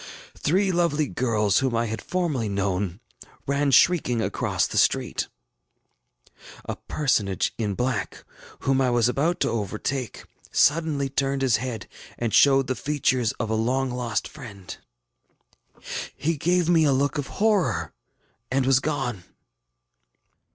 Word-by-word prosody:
Three 190 Hz, +5 st, +1 dB
lovely 170 Hz, -4 st, +1 dB
girls 110 Hz, -7 st, +1 dB
whom 130 Hz, -3 st, 0 dB
I 115 Hz, +1 st, +1 dB
had 110 Hz, 0 st, -4 dB
formerly 155 Hz, -, -1 dB
known, 95 Hz, -1 st, -1 dB, 0.5 s
ran 140 Hz, 0 st, +1 dB
shrieking 135 Hz, -3 st, +4 dB
across -, -, 0 dB
the -, -, 0 dB
street. -, -, +1 dB, 1.4 s
A -, -, -4 dB
personage 105 Hz, -10 st, 0 dB
in 105 Hz, -3 st, -1 dB
black, 125 Hz, -4 st, -2 dB, 0.4 s
whom 135 Hz, 0 st, +2 dB
I 130 Hz, -, +2 dB
was 120 Hz, -1 st, +3 dB
about 155 Hz, +8 st, 0 dB
to -, -, +2 dB
overtake, 115 Hz, +3 st, -3 dB, 0.3 s
suddenly 150 Hz, -2 st, +2 dB
turned 135 Hz, 0 st, -1 dB
his 125 Hz, -4 st, +3 dB
head 120 Hz, -2 st, -5 dB, 0.3 s
and 115 Hz, -2 st, -2 dB
showed 135 Hz, -1 st, +5 dB
the 130 Hz, -, -1 dB
features 130 Hz, -4 st, 0 dB
of 115 Hz, -4 st, -4 dB
a -, -, +1 dB
long 125 Hz, +4 st, 0 dB
lost 120 Hz, -3 st, -2 dB
friend. 105 Hz, -11 st, -10 dB, 1.4 s
He 165 Hz, +3 st, 0 dB
gave 175 Hz, +3 st, +1 dB
me 170 Hz, -2 st, +4 dB
a 145 Hz, -, +4 dB
look 140 Hz, +2 st, 0 dB
of 140 Hz, -, -3 dB
horror 210 Hz, -4 st, +1 dB, 0.6 s
and 130 Hz, 0 st, +1 dB
was 135 Hz, 0 st, +4 dB
gone. 135 Hz, -10 st, -3 dB
130 Hz, 135 wpm, -25 LUFS, 115-145 Hz, 1.4 s, showed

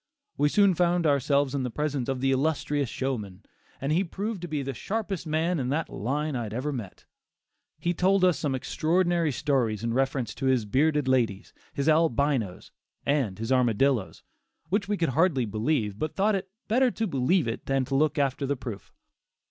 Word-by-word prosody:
We 145 Hz, +1 st, +2 dB
soon 200 Hz, +2 st, +4 dB
found 175 Hz, 0 st, +2 dB
ourselves 140 Hz, -1 st, +2 dB
in 140 Hz, -, -1 dB
the 125 Hz, -, -2 dB
presence 140 Hz, 0 st, -2 dB
of 130 Hz, -1 st, -2 dB
the 135 Hz, 0 st, +2 dB
illustrious 145 Hz, -1 st, 0 dB
showman, 110 Hz, -9 st, -4 dB, 0.4 s
and 135 Hz, +2 st, -2 dB
he 175 Hz, +5 st, +3 dB
proved 200 Hz, +2 st, -4 dB
to 175 Hz, -, -5 dB
be 150 Hz, -3 st, -2 dB
the 135 Hz, 0 st, -4 dB
sharpest 195 Hz, -, -3 dB
man 160 Hz, +2 st, 0 dB
in 125 Hz, -1 st, -2 dB
that 155 Hz, +4 st, -1 dB
line 145 Hz, +6 st, -2 dB
I 120 Hz, -, -1 dB
had 110 Hz, -1 st, -5 dB
ever 145 Hz, +4 st, -2 dB
met. 115 Hz, -8 st, -7 dB, 0.7 s
He 175 Hz, -, -1 dB
told 185 Hz, +2 st, +3 dB
us 175 Hz, -6 st, +2 dB
some 140 Hz, -2 st, -1 dB
extraordinary 170 Hz, +4 st, +1 dB
stories 120 Hz, -6 st, 0 dB
in 115 Hz, 0 st, -1 dB
reference 130 Hz, -3 st, 0 dB
to 135 Hz, +2 st, -3 dB
his 130 Hz, -4 st, +2 dB
bearded 145 Hz, +5 st, +2 dB
ladies, 115 Hz, -6 st, 0 dB, 0.2 s
his 140 Hz, +1 st, -2 dB
Albinos, 140 Hz, -, +1 dB, 0.3 s
and 135 Hz, -10 st, 0 dB
his 115 Hz, +3 st, -4 dB
Armadillos, 125 Hz, -2 st, +1 dB, 0.5 s
which 200 Hz, +2 st, 0 dB
we 205 Hz, 0 st, 0 dB
could 165 Hz, -4 st, +1 dB
hardly 145 Hz, -3 st, +2 dB
believe, 110 Hz, -1 st, -1 dB
but 155 Hz, -, -3 dB
thought 205 Hz, +2 st, +2 dB
it 190 Hz, -1 st, -2 dB, 0.2 s
"better 255 Hz, +3 st, +3 dB
to 225 Hz, -1 st, -2 dB
believe 160 Hz, -, +1 dB
it 115 Hz, -, -4 dB
than 135 Hz, -1 st, +1 dB
look 145 Hz, +3 st, +2 dB
after 140 Hz, 0 st, 0 dB
the 140 Hz, -, 0 dB
proof." 115 Hz, -6 st, -7 dB
140 Hz, 185 wpm, -27 LUFS, 125-165 Hz, 0.7 s, soon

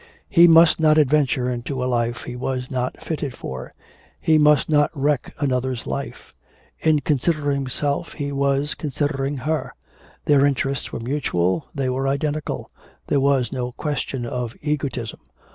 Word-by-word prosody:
He 170 Hz, 0 st, +7 dB
must 165 Hz, 0 st, +6 dB
not 155 Hz, -1 st, +4 dB
adventure 140 Hz, -4 st, +3 dB
into 125 Hz, +1 st, -3 dB
a -, -, 0 dB
life 120 Hz, -1 st, -1 dB
he 125 Hz, -, -6 dB
was 125 Hz, 0 st, -3 dB
not 125 Hz, -1 st, -2 dB
fitted 145 Hz, -5 st, -3 dB
for; 65 Hz, -1 st, -7 dB, 0.5 s
he 155 Hz, -1 st, +3 dB
must 150 Hz, -2 st, +4 dB
not 145 Hz, -1 st, +3 dB
wreck 145 Hz, -1 st, 0 dB
another's 130 Hz, -3 st, -1 dB
life; -, -, -6 dB, 0.5 s
in 155 Hz, -2 st, +3 dB
considering 145 Hz, 0 st, +1 dB
himself 140 Hz, +4 st, -2 dB
he 145 Hz, -2 st, -4 dB
was 140 Hz, +1 st, +1 dB
considering 145 Hz, -1 st, -2 dB
her; 155 Hz, +5 st, -2 dB, 0.5 s
their 140 Hz, -2 st, +5 dB
interests 140 Hz, -1 st, 0 dB
were -, -, -5 dB
mutual, 120 Hz, -, 0 dB
they 135 Hz, -2 st, -1 dB
were 130 Hz, +1 st, -1 dB
identical; 145 Hz, +2 st, -2 dB, 0.3 s
there 140 Hz, -, +1 dB
was 135 Hz, -3 st, +2 dB
no 125 Hz, -2 st, -3 dB
question 135 Hz, -4 st, -3 dB
of 120 Hz, -1 st, -4 dB
egotism. 140 Hz, -6 st, -2 dB
140 Hz, 145 wpm, -22 LUFS, 125-150 Hz, 0.5 s, He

